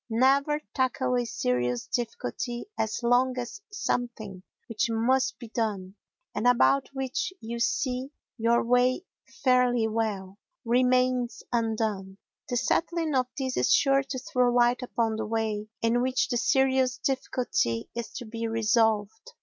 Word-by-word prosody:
Never 275 +6 +3
tackle 260 -1 0
a 245 -1 +1
serious 125 - -1
difficulty 240 - -4
as 220 +2 -2
long 250 +2 +3
as 245 +11 -5
something 230 - -3 0.3
which 230 +1 0
must 255 +3 +1
be 235 -2 -10
done, 205 -5 -2 0.4
and 215 +4 0
about 255 +2 +4
which 265 +5 -2
you 235 +1 -5
see 255 +2 -1 0.3
your 235 0 +2
way 250 +7 +2 0.4
fairly 250 -3 +3
well, 210 -3 -3 0.3
remains 250 0 +2
undone; 220 -4 -1 0.3
the 245 - 0
settling 330 +4 0
of 255 -2 +2
this 260 -2 -2
is - - +2
sure 275 -1 +4
to 270 -1 -5
throw 250 -1 +1
light 240 +1 +3
upon 230 -3 -1
the 220 - -2
way 215 -1 -2 0.2
in 230 +1 +2
which 255 +1 +1
the 245 - 0
serious 260 0 +2
difficulty 250 - -1
is 235 -2 -5
to 245 - -6
be 230 +1 -4
resolved. 220 -1 +1
240 Hz, 140 wpm, -27 LUFS, 225-255 Hz, 0.4 s, about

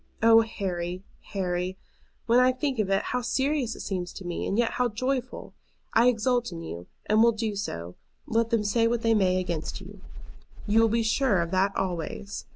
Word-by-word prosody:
Oh, 225 0 +7
Harry, 185 -5 -4 0.3
Harry, 180 -1 -2 0.5
when 235 +1 +4
I 255 0 +4
think 265 -1 -2
of 205 -3 +1
it, 195 0 +2
how 250 - 0
serious 265 0 0
it - - -8
seems 180 -2 -3
to 195 - -9
me, 175 -1 -3
and 200 - -1
yet 240 -1 +2
how 250 -1 0
joyful! 255 +3 -3 0.4
I 235 - +5
exult 245 -1 +1
in 165 -1 -7
you, 85 - -7 0.2
and 215 +1 +3
will 235 0 +5
do 220 -1 -2
so, 85 - -5 0.3
let 230 0 +1
them 230 -3 +1
say 230 +3 +2
what 235 0 -1
they 225 0 +4
may 185 -3 +3
against 170 -4 -3
you. - - -12 0.6
You 220 +2 +4
will 225 - +4
be 230 +1 +1
sure 220 -2 +2
of 170 0 -2
that 195 +1 +1
always. 190 +2 -4
215 Hz, 195 wpm, -27 LUFS, 185-235 Hz, 0.6 s, Oh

